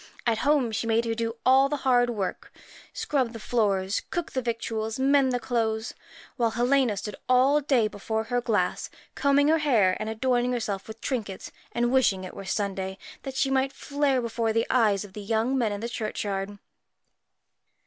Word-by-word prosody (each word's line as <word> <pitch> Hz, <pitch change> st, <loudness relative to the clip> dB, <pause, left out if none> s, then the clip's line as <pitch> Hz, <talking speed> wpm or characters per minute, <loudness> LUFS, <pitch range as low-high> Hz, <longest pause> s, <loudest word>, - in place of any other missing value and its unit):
At 230 Hz, -2 st, +1 dB
home 280 Hz, -4 st, +2 dB
she 225 Hz, +1 st, -2 dB
made 230 Hz, +1 st, +2 dB
her 230 Hz, -, 0 dB
do 230 Hz, 0 st, -2 dB
all 265 Hz, +2 st, +5 dB
the 295 Hz, -, -1 dB
hard 245 Hz, -2 st, +4 dB
work 205 Hz, -6 st, -4 dB, 0.4 s
scrub 260 Hz, -5 st, -1 dB
the 225 Hz, -, -7 dB
floors, 200 Hz, -4 st, 0 dB
cook 345 Hz, -2 st, -3 dB
the 260 Hz, -, -1 dB
victuals, 225 Hz, -2 st, -3 dB
mend 270 Hz, 0 st, +3 dB
the 245 Hz, -, 0 dB
clothes 225 Hz, -2 st, -1 dB, 0.5 s
whilst 230 Hz, -2 st, +1 dB
Helena 245 Hz, -3 st, +2 dB
stood 205 Hz, 0 st, -5 dB
all 265 Hz, +4 st, +4 dB
day 260 Hz, -6 st, +2 dB
before 220 Hz, +2 st, -3 dB
her 245 Hz, +2 st, -1 dB
glass, 210 Hz, -7 st, 0 dB, 0.2 s
combing 280 Hz, 0 st, +3 dB
her 320 Hz, +1 st, +4 dB
hair 220 Hz, -11 st, +3 dB
and 215 Hz, -, -3 dB
adorning 245 Hz, +2 st, +1 dB
herself 215 Hz, -5 st, -3 dB
with 220 Hz, 0 st, -10 dB
trinkets, 215 Hz, -8 st, -4 dB, 0.2 s
and 240 Hz, 0 st, 0 dB
wishing 225 Hz, -8 st, +3 dB
it 185 Hz, -, -8 dB
were 195 Hz, -, -8 dB
Sunday 190 Hz, -1 st, -2 dB, 0.2 s
that 270 Hz, -1 st, -7 dB
she 270 Hz, +1 st, +1 dB
might 270 Hz, 0 st, +2 dB
flare 280 Hz, -3 st, 0 dB
before 230 Hz, -1 st, -1 dB
the 230 Hz, +1 st, +1 dB
eyes 215 Hz, -5 st, +3 dB
of 195 Hz, -, -14 dB
the 210 Hz, -, -7 dB
young 225 Hz, +5 st, 0 dB
men 235 Hz, -5 st, +1 dB
in 205 Hz, 0 st, -4 dB
the 235 Hz, -, -2 dB
churchyard. 205 Hz, -3 st, -3 dB
230 Hz, 180 wpm, -26 LUFS, 215-260 Hz, 0.5 s, all